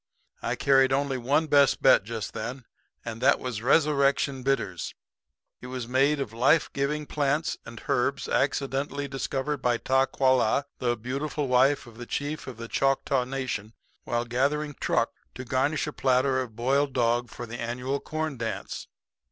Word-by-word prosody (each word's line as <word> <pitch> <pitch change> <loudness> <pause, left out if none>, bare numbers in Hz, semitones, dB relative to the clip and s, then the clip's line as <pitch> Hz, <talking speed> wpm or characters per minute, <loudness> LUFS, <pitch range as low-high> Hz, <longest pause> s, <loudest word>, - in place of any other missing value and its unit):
I - - -1
carried 135 -1 +4
only 135 -1 0
one 140 +6 +2
best 145 -3 +4
bet - - +6
just 110 0 -5
then, 120 +3 -5 0.4
and 115 0 -6
that 130 - +4
was 125 -4 -4
Resurrection 140 0 +2
Bitters. 115 -10 -1 0.7
It 125 - -8
was 125 -2 -5
made 135 +4 +2
of 125 -6 -4
life 135 +7 +3
giving 150 +2 -1
plants 150 +2 0
and 115 -1 -9
herbs 135 +2 0
accidentally 140 +1 -1
discovered 135 +2 -2
by 125 -3 +1
Ta 135 +2 +2
qua 130 -1 +2
la, 130 +1 +3 0.2
the 120 -1 0
beautiful 140 +5 -3
wife 130 +3 +3
of 115 -1 -14
the 120 - -7
chief 145 +2 -3
of 130 -4 -7
the 115 0 -7
Choctaw 135 0 +1
Nation, 125 -5 -4 0.3
while 120 0 -1
gathering 145 +5 0
truck - - +1 0.2
to 130 - -7
garnish 130 +5 0
a 150 - -5
platter 130 0 +2
of 120 -4 -7
boiled 135 +4 +1
dog 120 -1 +1
for 120 - -7
the 120 +1 -7
annual 125 +4 -2
corn 155 -2 -3
dance. 115 -1 -4
130 Hz, 165 wpm, -27 LUFS, 120-140 Hz, 0.7 s, bet